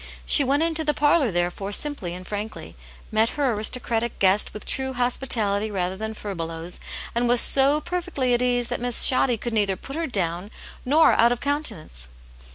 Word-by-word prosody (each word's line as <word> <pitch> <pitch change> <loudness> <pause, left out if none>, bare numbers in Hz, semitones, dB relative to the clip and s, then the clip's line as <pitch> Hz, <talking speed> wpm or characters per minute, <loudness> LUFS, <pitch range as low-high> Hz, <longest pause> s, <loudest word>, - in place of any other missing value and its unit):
She 290 - +5
went 280 +4 +1
into 325 -1 +1
the 300 -1 +1
parlour, 290 -2 +3
therefore, 175 +2 -2
simply 205 -8 -2
and 185 0 -8
frankly, 210 +1 -6 0.4
met 220 +1 +2
her 275 -4 +1
aristocratic 230 +2 -1
guest 195 +2 +2
with 210 - -9
true 265 0 -3
hospitality 230 -4 0
rather 185 -2 -2
than 220 +2 -5
furbelows, 165 -4 -4 0.3
and 240 +1 +1
was 245 0 +4
so 275 +4 +4
perfectly 325 -7 -2
at 240 - +1
ease 245 -1 +1
that 245 - -3
Miss 245 -1 +3
Shoddy 255 -2 +4
could 235 +2 -5
neither 205 -3 +1
put 275 +9 -9
her 330 0 -2
down 180 -3 -3 0.4
nor 305 +5 +5
out 235 +1 +4
of 245 - -1
countenance. 215 - -2
235 Hz, 175 wpm, -23 LUFS, 200-270 Hz, 0.4 s, She